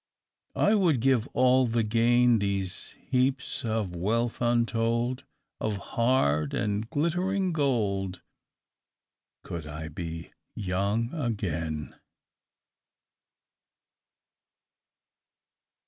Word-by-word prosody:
"I 210 - +3
would 175 - +3
give 130 -1 +2
all 130 0 +4
the 115 0 +1
gain, 120 +2 +4
These 100 -2 -2
heaps 130 +1 -1
of 110 -5 -2
wealth 115 +7 -1
untold 120 +1 +1 0.3
Of 105 -2 -1 0.2
hard 75 - +2
and 105 +2 -1
glittering 180 +4 0
gold, 100 - 0 1.2
Could 80 -3 -6
I 75 +1 -6
be 80 +1 -6 0.2
young 100 - -1
again!" 85 - -3
115 Hz, 80 wpm, -28 LUFS, 95-125 Hz, 1.2 s, all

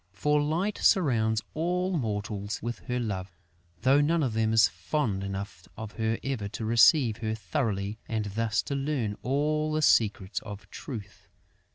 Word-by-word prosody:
For 150 +8 +2
Light 170 +8 -1
surrounds 115 - +3
all 180 +3 0
mortals 105 -5 -3
with 120 0 -4
her 125 -1 -1
love, 100 -5 -3 0.5
though 135 +3 +5
none 160 +2 +2
of 125 -5 -1
them 110 0 +1
is 110 -1 +6
fond 95 - -2
enough 100 -3 -6
of 110 -1 -6
her 110 0 -1
ever 130 -7 -2
to 110 +2 -5
receive 115 +1 +5
her 110 -1 -2
thoroughly 105 - -2
and 110 -2 -1
thus 110 +2 0
to - - -4
learn 135 -7 -1
all 150 +3 0
the 155 0 0
secrets 105 -6 +3
of 105 -1 -9
Truth. 110 -8 -8
115 Hz, 160 wpm, -28 LUFS, 105-145 Hz, 0.5 s, is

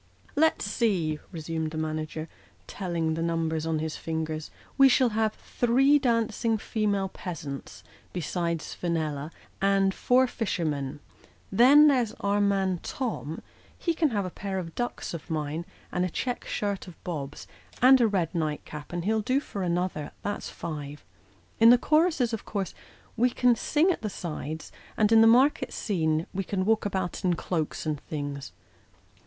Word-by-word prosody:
" - - -28
Let's 320 - 0
see," 190 -8 0
resumed 160 -2 -3
the 155 - -6
manager, 155 0 -3 0.4
telling 170 -4 -2
the 165 - -2
number 165 -1 0
on 160 -1 +1
his 155 0 -3
fingers, 160 -1 -3
" - - -28
we 270 0 +9
shall 255 0 +4
have 220 0 0
three 270 +5 +3
dancing 230 -3 +1
female 205 -2 0
peasants, 150 -8 -7 0.3
besides 170 -1 -2
Fenella, 155 -4 -2 0.3
and 195 0 +3
four 255 +5 +3
fishermen. 155 - -2 0.5
Then, 265 +9 +7
there's 250 -6 +2
our 200 +1 0
man 195 -3 +1
Tom; 215 - -4 0.3
he 335 - 0
can 320 -2 +2
have 205 -5 -1
a 185 - -5
pair 195 +1 -4
of 165 -3 -5
ducks? 240 -6 -3
of 165 - -7
mine, 155 +1 -3 0.2
and 180 - 0
a 185 - 0
check 245 +7 -3
shirt 200 -2 -2
of 180 - -10
Bob's, 145 -6 -5 0.3
and 260 +1 +7
a 235 - +5
rod 185 -6 0
night 155 -3 -2
cap, 150 -1 -9
and 175 0 -3
he'll 220 +1 +2
do 255 +6 +1
for 205 -8 -6
another 175 -4 -1
that's 205 0 -3
five. 150 -2 -7 0.5
In 225 - +8
the 245 - +8
choruses, 305 -4 +2
of 225 - -3
course, 195 -4 -3 0.4
we 245 +2 +3
can 245 0 +3
sing 310 - +2
at - - -3
the 215 - -2
sides; 160 -4 -5 0.3
and 215 0 +3
in 225 0 +7
the 225 - +7
market 255 +6 +4
scene 160 -6 0
we 195 - -1
can 185 0 -2
walk 220 -1 +2
about 190 -1 -3
in 180 -2 +2
cloaks 165 -3 -3
and 150 -2 -1
things. 145 -2 -5
185 Hz, 165 wpm, -27 LUFS, 160-225 Hz, 0.5 s, we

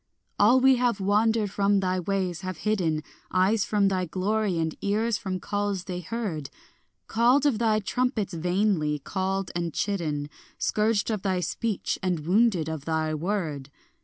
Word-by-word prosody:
All 235 +6 +6
we 265 0 +5
have 240 -4 +1
wandered 210 +1 +2
from 200 0 +2
thy 185 -1 0
ways, 185 -1 -2
have 185 -1 -5
hidden 170 -8 +1 0.3
Eyes 195 +3 +2
from 205 -2 +2
thy 185 -2 0
glory 195 +2 0
and 160 -1 -1
ears 215 +2 0
from 185 -2 -3
calls 205 -1 -2
they 180 -2 -5
heard; 180 - -4 0.6
Called 245 +5 +3
of 260 -7 +2
thy 220 -2 +2
trumpets 225 -3 -1
vainly, 175 -3 +1
called 190 +5 -2
and 170 -2 -2
chidden, 155 -8 -2 0.3
Scourged 215 0 +1
of 210 -3 -2
thy 185 -2 0
speech 215 +3 -2
and 180 -4 -1
wounded 190 -3 +3
of 160 -3 -5
thy 160 -1 0
word. 155 -5 -2
195 Hz, 155 wpm, -26 LUFS, 175-215 Hz, 0.6 s, All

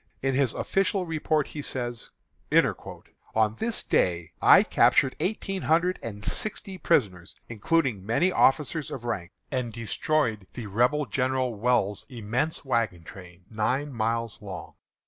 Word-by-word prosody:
In 135 0 +1
his 130 -3 +1
official 195 -1 0
report 155 -2 0
he 150 - -6
says: 120 -4 -4 1.3
"On 110 -1 +2
this 225 0 -1
day 85 -1 +1
I - - +8
captured 130 - +3
eighteen 195 +2 -2
hundred 170 +3 +2
and 105 -3 -7
sixty 195 -3 -3
prisoners, 95 - 0
including 120 - 0
many 120 - +2
officers 150 0 +2
of 120 -3 -7
rank, 85 -7 -3 0.2
and 125 -3 -2
destroyed 115 - -1
the 120 - -5
Rebel 125 +9 +1
General 130 +1 0
Ewell's 105 -2 0
immense 125 +6 -2
wagon 115 -9 0
train, 90 +1 -13
nine 130 +6 -1
miles 115 0 -2
long." 95 -5 -8
125 Hz, 130 wpm, -27 LUFS, 105-150 Hz, 1.3 s, I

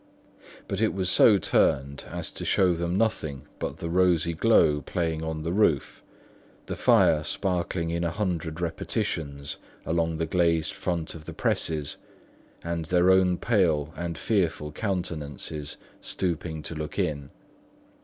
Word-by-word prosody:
But 100 +1 -2
it 110 -3 +2
was 95 -1 0
so 105 -3 +7
turned 70 -5 +1
as - - -4
to - - -6
show 95 -2 +3
them 85 +2 -1
nothing 80 -11 -1 0.2
but - - -4
the 85 - -5
rosy 85 -1 +2
glow 80 -6 +4
playing 80 +2 -2
on 80 -1 -3
the 85 +2 -2
roof, 90 -9 +1 0.6
the - - -4
fire 75 -1 +4
sparkling 90 -1 -1
in 85 +1 -1
a 85 - +1
hundred 85 -4 -2
repetitions 70 -4 -2 0.3
along 80 +1 0
the 80 - 0
glazed 85 -1 +1
front 85 -3 -3
of 80 -2 -11
the - - -7
presses, 75 -3 0 0.7
and 85 -1 -3
their 90 +2 +4
own 95 -1 +4
pale 85 -10 +1
and 85 -2 -4
fearful 85 -6 0
countenances 75 - -3 0.2
stooping 85 -3 -3
to - - -5
look 75 -1 -6
in. 70 -2 -1
85 Hz, 145 wpm, -27 LUFS, 80-90 Hz, 0.7 s, so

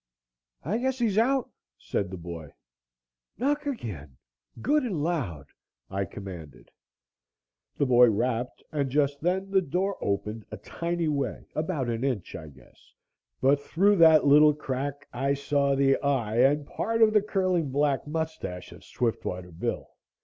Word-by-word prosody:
"I 200 - -1
guess 260 +1 -1
he's 220 -4 +1
out," 260 +2 +1 0.3
said 100 +8 -3
the 95 - -6
boy. 85 -3 -8 0.8
"Knock 290 +4 0
again 85 - -6 0.4
good 295 +4 +2
and 195 - -2
loud," 125 - -2 0.5
I 100 0 -1
commanded. 85 -8 -10 1.1
The 145 - +2
boy 125 -2 +6
rapped 120 +3 -2
and 145 -3 -1
just 140 +1 +1
then 190 +3 -1
the 190 -1 +4
door 185 +5 -2
opened 105 +2 -2
a - - -7
tiny 170 - -3
way 140 -6 -2
about 155 -5 -2
an 115 +1 -2
inch, 125 -9 -2
I 80 -3 -8
guess, 65 -5 -19 0.5
but 140 +2 +4
through 195 +7 +2
that 160 -3 +7
little 150 +1 +6
crack 140 0 -4
I 135 +3 0
saw 140 0 +1
the 135 0 +3
eye 125 -6 0
and 140 +4 +4
part 225 +8 0
of 215 -1 +5
the 210 - +5
curling 185 -6 0
black 145 +1 0
moustache 160 - -4
of - - -13
Swiftwater 90 -7 -3
Bill. 80 - -3
140 Hz, 150 wpm, -27 LUFS, 115-175 Hz, 1.1 s, that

